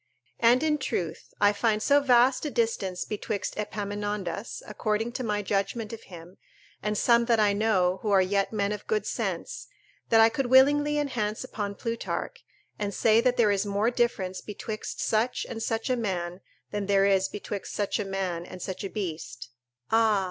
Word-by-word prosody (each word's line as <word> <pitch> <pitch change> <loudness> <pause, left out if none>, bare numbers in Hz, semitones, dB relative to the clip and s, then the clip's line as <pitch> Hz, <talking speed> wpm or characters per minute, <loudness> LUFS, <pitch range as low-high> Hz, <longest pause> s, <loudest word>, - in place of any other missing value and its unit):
And, 240 +4 +5
in 305 -1 +1
truth, 170 - -3
I 205 0 +5
find 215 0 +1
so 285 +6 +4
vast 255 -1 +4
a 300 - -1
distance 225 -7 -1
betwixt 205 -1 -3
Epaminondas, 205 -1 -4
according 220 +1 -1
to 255 - -4
my 210 -2 -1
judgment 210 +3 -2
of 225 - -7
him, 175 0 -12 0.4
and 210 0 -1
some 235 +1 +4
that 230 -2 +3
I 205 -1 +4
know, 190 -4 +2
who 215 - -2
are 200 -1 +5
yet 195 +1 +1
men 205 -2 0
of 210 -1 -6
good 435 -1 0
sense, - - -3 0.4
that 225 - +5
I 225 - +8
could 245 +3 -1
willingly 290 +3 +5
enhance 240 -8 -1
upon 200 -1 -4
Plutarch, 230 - -4 0.4
and 205 -2 -2
say 225 0 +4
that 250 0 +1
there 215 -3 +4
is 200 0 +1
more 205 +3 0
difference 195 -7 -1
betwixt 215 +1 -6
such 225 +3 0
and 225 -2 -6
such 225 0 -1
a 255 - +2
man 185 -5 -3 0.3
than 205 -1 -3
there 195 -1 +4
is 195 -1 +3
betwixt 205 -1 -6
such 205 +2 -1
a - - 0
man 190 -3 -3
and 180 +1 -10
such 190 +2 -5
a 195 - -3
beast: 155 - -5 0.4
["Ah! 220 -2 +4
210 Hz, 180 wpm, -27 LUFS, 195-235 Hz, 0.4 s, I